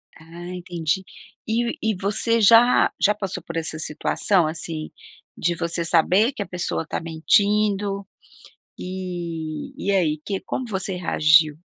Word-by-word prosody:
Ah 170 +2 -11
entendi. 175 0 -2 0.4
E 235 +1 -1
e 220 -1 0
você 210 +5 +1
já 230 +4 +6
já 210 - +4
passou 195 -2 -5
por 170 - -8
essa 160 -1 -2
situação, 160 +3 +1
assim, 155 0 -5 0.5
de 175 - +1
você 170 0 -2
saber 185 - +3
que - - -6
a 200 - -4
pessoa 175 -2 -3
tá - - -3
mentindo, 200 +4 +1 0.7
e 175 -4 -5
e - - -2
aí, 160 -6 +1
que 195 -2 -3
como 255 - -4
você 190 -1 -3
reagiu? 155 -3 +4
180 Hz, 140 wpm, -23 LUFS, 165-205 Hz, 0.7 s, já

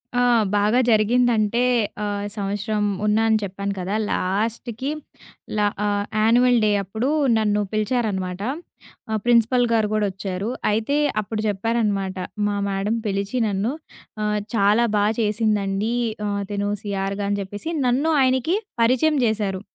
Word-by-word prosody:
ఆ! - - +2 0.4
బాగా 210 +5 +3
జరిగిందంటే 230 +1 +3 0.4
ఆహ్, 205 0 -2
సంవత్సరం 205 +1 -2 0.2
ఉన్నా 215 +1 +3
అని 220 - +4
చెప్పాను 200 +1 -3
కదా! 190 +3 -2 0.2
లాస్ట్‌కి 230 +7 -2 0.7
ల - - +1 0.3
ఆహ్, 205 0 0 0.2
యాన్యువల్ 240 +2 +4
డే 210 - +3
అప్పుడు 220 +8 -2 0.3
నన్ను 210 -1 +1
పిలిచారనమాట. 205 -4 -1 0.7
ఆ - - 0
ప్రిన్సిపల్ 240 +1 +4
గారు 220 -2 +2
గూడొచ్చారు. 195 0 -2 0.2
అయితే 225 +7 0 0.2
అప్పుడు 215 +1 -4
చెప్పారనమాట 205 -2 -1 0.3
మా 205 - -1
మేడమ్ 200 +4 -1
పిలిచి 200 +4 -2
నన్ను 205 +4 -1 0.5
ఆహ్, 210 0 0 0.2
చాలా 210 +3 +4
బా 205 - +3 0.2
చేసిందండి 210 0 0 0.3
ఆహ్, 200 0 -2
తిను 205 0 -1
సీఆర్‌గా 200 0 -2
అని 205 0 0
చెప్పేసి 205 - -6 0.2
నన్ను 280 +7 +2
ఆయనకి 260 - +2 0.2
పరిచయం 260 +6 +3
జేసారు. 205 -4 -1
210 Hz, 125 wpm, -22 LUFS, 200-230 Hz, 0.7 s, అని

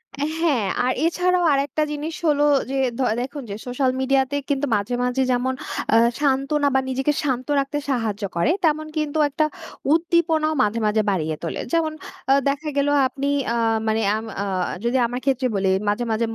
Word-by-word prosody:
অ্যা 285 - -2 0.2
হ্যাঁ, 265 - +2 0.2
আর 255 - +2
এছাড়াও 360 +1 +2
আরেকটা 280 +2 0
জিনিস 300 +2 -4
হলো 290 -1 +3 0.3
যে, 275 - -1 0.2
দ - - -11 0.2
দেখুন 275 +2 -5
যে 200 - -4
সোশ্যাল 255 +1 +1
মিডিয়া 265 +1 +3
তে 285 - 0
কিন্তু 285 0 +1
মাঝে, 205 +4 -1
মাঝে 250 +1 0
যেমন 255 +1 0 0.4
আ - - +7 0.2
সান্ত্বনা, 285 +1 +1
বা 265 - +5
নিজেকে 270 +3 0
শান্ত 255 -3 -1
রাখতে 275 +2 -2
সাহায্য 220 -5 -2
করে, 170 - +2
তেমন 310 0 +1
কিন্তু 305 0 -1
একটা 305 +2 +1 0.5
উদ্দীপনাও 325 -2 +2
মাঝে, 215 +2 0
মাঝে 215 +1 +2
বাড়িয়ে 160 -5 -1
তোলে। 165 - -3
যেমন 320 -2 +1 0.4
আ - - +8 0.2
দেখা 300 +2 -2
গেল, 280 0 +2 0.2
আপনি 275 +1 -4 0.3
আ - - -1 0.3
মানে 220 +1 +1
আম 220 - -4 0.2
আ - - -3 0.4
যদি 245 +2 +2
আমার 245 +1 -4
ক্ষেত্রে 265 -1 +1
বলি 195 -1 +1 0.2
মাঝে, 210 +4 0
মাঝে 220 +1 +1
275 Hz, 180 wpm, -22 LUFS, 245-300 Hz, 0.5 s, আ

